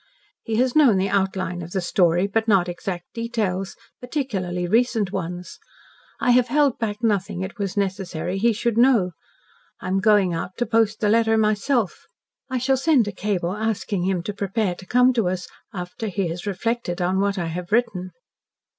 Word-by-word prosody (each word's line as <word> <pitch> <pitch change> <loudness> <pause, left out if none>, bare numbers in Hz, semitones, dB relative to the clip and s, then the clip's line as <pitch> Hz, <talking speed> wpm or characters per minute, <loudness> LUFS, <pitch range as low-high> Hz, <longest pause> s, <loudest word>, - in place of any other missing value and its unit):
He 225 - -3
has 250 +2 +1
known 270 -10 +6
the 190 +1 +1
outline 190 -3 -1
of 170 +1 -8
the 195 - 0
story, 175 0 +2
but 220 +3 -1
not 195 -5 +4
exact 175 0 -5
details 215 -5 -2 0.2
particularly 195 - -3
recent 225 -1 +2
ones. 180 -1 -5 0.6
I 245 - +3
have 245 0 +4
held 285 0 +2
back 215 0 -3
nothing 200 -4 0
it 195 +4 -7
was 200 -1 -3
necessary 190 -2 -2
he 235 +3 +4
should 230 +1 0
know. 235 -8 +4 0.7
I - - -5
am 190 +1 +1
going 205 -3 +4
out 175 +3 -5
to 240 - 0
post 225 -1 +1
the 210 - +2
letter 225 0 +3
myself. 215 +1 0 0.4
I 260 - -1
shall 265 +2 +2
send 265 -5 +3
a - - -2
cable 185 -3 -2
asking 210 -4 -2
him 185 -2 0
to 205 - -4
prepare 200 0 -1
to 185 +1 -13
come 250 +1 +4
to 225 -7 +1
us 185 0 -4 0.2
after 180 +4 -5
he 195 -3 -1
has 175 +4 -6
reflected 205 -1 -2
on 185 +2 +1
what 200 0 +1
I 175 - -1
have 175 +3 -5
written." 215 -6 +1
200 Hz, 180 wpm, -23 LUFS, 185-230 Hz, 0.7 s, known